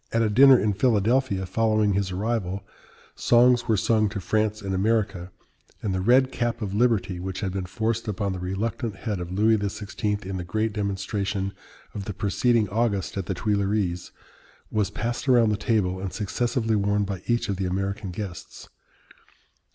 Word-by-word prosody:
At 115 0 +2
a 110 - +1
dinner 135 +4 +8
in 105 -1 +1
Philadelphia, 110 -1 +1
following 110 0 +2
his 100 0 0
arrival, 100 -1 -2 0.5
songs 120 0 +4
were 110 -2 +3
sung 110 0 +2
to 105 0 -4
France 105 +2 0
and 95 -1 -2
America, 100 -2 0 0.5
and 100 - -1
the 95 - -1
red 130 +6 +4
cap 120 -1 -2
of 100 -2 -4
liberty, 105 -5 +1
which 95 +1 -5
had 95 -3 -2
been 95 -2 -3
forced 110 +4 -2
upon 100 -2 -2
the 90 - -5
reluctant 105 +5 -3
head 105 -5 -4
of 90 0 -6
Louis 110 +3 +3
XVI. 105 0 -3
in 95 0 -4
the 90 - -4
great 110 +5 -1
demonstration 100 -1 -2 0.4
of 100 -2 -5
the 105 - -5
preceding 110 +2 +1
August 105 -2 -1
at 95 -2 -3
the 95 - -2
Tuileries, 100 -2 -1 0.6
was 105 -3 +1
passed 120 +3 -3
around 120 -3 +5
the 105 - +1
table 100 -3 0
and 95 -1 -4
successively 115 +2 -1
worn 100 0 +1
by 100 -2 -4
each 120 0 +1
of 100 -3 -2
the 95 - -2
American 95 +2 -2
guests. 90 -1 -8
105 Hz, 175 wpm, -25 LUFS, 95-115 Hz, 0.6 s, dinner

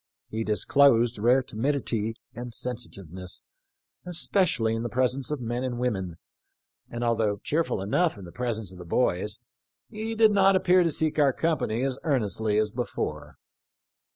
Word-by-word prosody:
He 110 +1 -2
disclosed 120 0 +3
rare 125 +4 +4
timidity 115 -3 -1 0.2
and 120 0 -7
sensitiveness, 95 -7 -6 0.6
especially 175 - +1
in 115 - -2
the 120 - -3
presence 130 +1 0
of 150 -2 -2
men 120 +2 -2
and 125 -2 -2
women, 95 -9 -2 0.7
and 120 0 -4
although 110 -3 +1
cheerful 155 -10 0
enough 160 - +1
in 100 - -9
the 85 - -10
pres 120 0 -2
ence 105 -5 -7
of 90 - -12
the - - -7
boys, 105 +1 0 0.5
he 220 +1 -4
did 220 -1 +5
not 195 -1 +5
appear 185 -1 +4
to 170 - +2
seek 155 0 0
our 140 -3 +4
company 130 -8 0
as 135 -1 -1
earnestly 110 -7 0
as 105 -1 +1
before." 75 - -4
120 Hz, 155 wpm, -27 LUFS, 110-145 Hz, 0.7 s, did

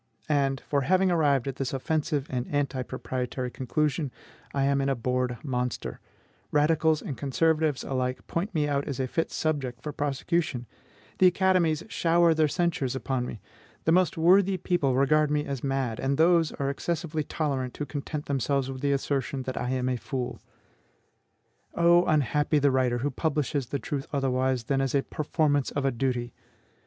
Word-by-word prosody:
And, 135 -3 +1
for 140 -1 +1
having 185 +6 +3
arrived 145 -6 +2
at 135 - -4
this 135 -1 -2
offensive 150 +1 -1
and 125 -1 -2
anti 140 -2 -1
proprietary 125 0 -4
conclusion, 145 +3 -1 0.4
I 140 - 0
am 140 0 +2
an 135 - 0
abhorred 125 -1 -1
monster; 125 -4 -3 0.5
radicals 155 +1 +3
and 140 - -4
conservatives 155 +1 +1
alike 130 -1 -2
point 180 +3 -3
me 150 -2 +2
out 140 -1 0
as 140 -3 -4
a 130 - +1
fit 165 +6 -1
subject 135 -6 -2
for 150 - -5
prosecution; 145 -2 -1 0.5
the 185 - +7
academies 180 -4 +2
shower 170 -4 +3
their 155 -1 +3
censures 150 -5 0
upon 130 -2 -2
me; 110 - -7 0.4
the 160 - +2
most 180 0 +3
worthy 185 +3 +4
people 165 -7 +1
regard 150 +3 +3
me 150 0 0
as 140 -3 -4
mad; 135 -5 -1
and 135 +1 0
those 165 -1 +4
are 140 0 -1
excessively 160 +1 -2
tolerant 135 -5 -2
who 150 - -2
content 145 +1 -5
themselves 135 0 0
with 130 -1 -7
the 140 0 +2
assertion 135 -1 -1
that 130 0 -4
I 125 - -2
am 130 -1 0
a 130 -1 0
fool. 125 0 -4 1.4
Oh, 170 +1 +5
unhappy 150 0 +2
the 145 -1 +3
writer 130 -2 +2
who 145 - 0
publishes 145 -2 -1
the 140 - -2
truth 140 0 -4
otherwise 130 -3 0
than 135 +3 0
as 135 0 0
a 140 - +3
performance 150 -2 0
of 140 -1 -2
a 135 - +3
duty! 120 -1 -2
140 Hz, 170 wpm, -27 LUFS, 130-155 Hz, 1.4 s, the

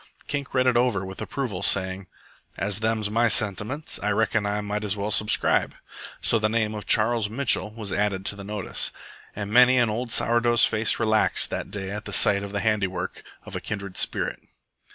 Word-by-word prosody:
Kink 140 -2 -4
read 130 0 +3
it 125 -1 +3
over 120 -6 +1
with 95 0 -8
approval, 120 -10 -4
saying: 95 0 +2 0.5
"As 100 +1 -2
them's 110 -1 -1
my 115 +2 +2
sentiments, 110 - 0
I 105 - -1
reckon 110 0 0
I 105 +1 -1
might 105 +1 -4
as 105 0 -1
well 100 +1 -3
subscribe." 105 0 +2 0.5
So 115 - +3
the 110 0 +1
name 110 -1 0
of 105 -1 -7
Charles 110 -1 +2
Mitchell 120 -2 +1
was 105 -2 -6
added 100 -2 -1
to 100 - +2
the 100 - -9
notice; 105 0 -2 0.5
and 100 0 -5
many 125 +2 +6
an 120 -3 +2
old 120 +2 -4
sour 120 +1 +2
dough's 120 0 +5
face 110 0 +1
relaxed 110 -1 +1
that - - -4
day 95 -1 -5
at 105 +1 -6
sight 100 0 +5
of 100 0 -7
the 100 0 -2
handiwork 95 -4 -2 0.2
of - - -9
a - - -4
kindred 100 -3 -6
spirit. - - -2
105 Hz, 195 wpm, -24 LUFS, 100-115 Hz, 0.5 s, many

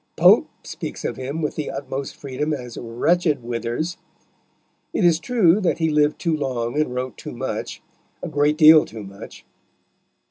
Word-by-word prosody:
Pope - - +5
speaks - - -7
of - - -2
him 140 +5 -4
with 150 - -1
the 155 - -4
utmost 135 0 -5
freedom 145 +3 -3
as 125 -4 -6
"wretched 145 +5 0
Withers." 120 +8 -3 1.0
It 190 - +1
is 165 -2 +4
true 210 -4 +3
that 185 - +1
he 160 -1 +1
lived 150 0 +2
too 165 -2 0
long 125 -5 -2
and 125 -5 -2
wrote 125 -2 -4
too - - -8
much - - -5 0.4
a - - -2
great 145 +1 +1
deal 155 -1 +8
too 110 -1 -9
much. 100 0 -11
145 Hz, 165 wpm, -22 LUFS, 125-160 Hz, 1.0 s, deal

